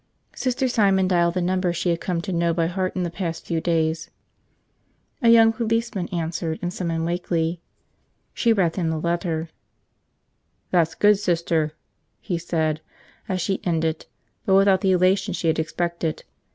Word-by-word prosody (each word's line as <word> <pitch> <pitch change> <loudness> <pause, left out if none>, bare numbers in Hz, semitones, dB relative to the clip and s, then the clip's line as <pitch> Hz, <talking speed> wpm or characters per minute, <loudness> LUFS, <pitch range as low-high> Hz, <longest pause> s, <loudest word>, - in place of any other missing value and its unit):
Sister 255 0 0
Simon 195 -6 +3
dialed 175 -1 +2
the 180 - 0
number 185 0 +1
she 175 +1 0
had 170 - -2
come 175 -2 -1
to 190 +1 -4
know 170 -1 +1
by 165 -1 +1
heart 185 +2 -2
in 185 - -1
the 170 - -3
past 170 -2 -4
few 165 -2 -1
days. 165 -1 0 1.1
A 235 - +4
young 225 -1 +7
policeman 230 -4 -1
answered 165 -2 -3
and 175 0 -2
summoned 165 -3 -2
Wakeley. 170 -1 -1 0.7
She 235 - +2
read 185 -6 +1
him 170 -3 0
the 160 - -1
letter. 170 -1 -2 1.2
"That's 170 -3 +2
good, 210 -1 +4
Sister," 165 -5 0 0.5
he 175 -2 -3
said 160 -2 -1 0.5
as 185 -1 -1
she 195 +1 -2
ended, 160 -2 -1 0.4
but 190 - +4
without 195 -1 +4
the 195 - +2
elation 185 +1 +2
she 165 - 0
had 160 - +1
expected. 170 0 -2
175 Hz, 160 wpm, -23 LUFS, 165-190 Hz, 1.2 s, young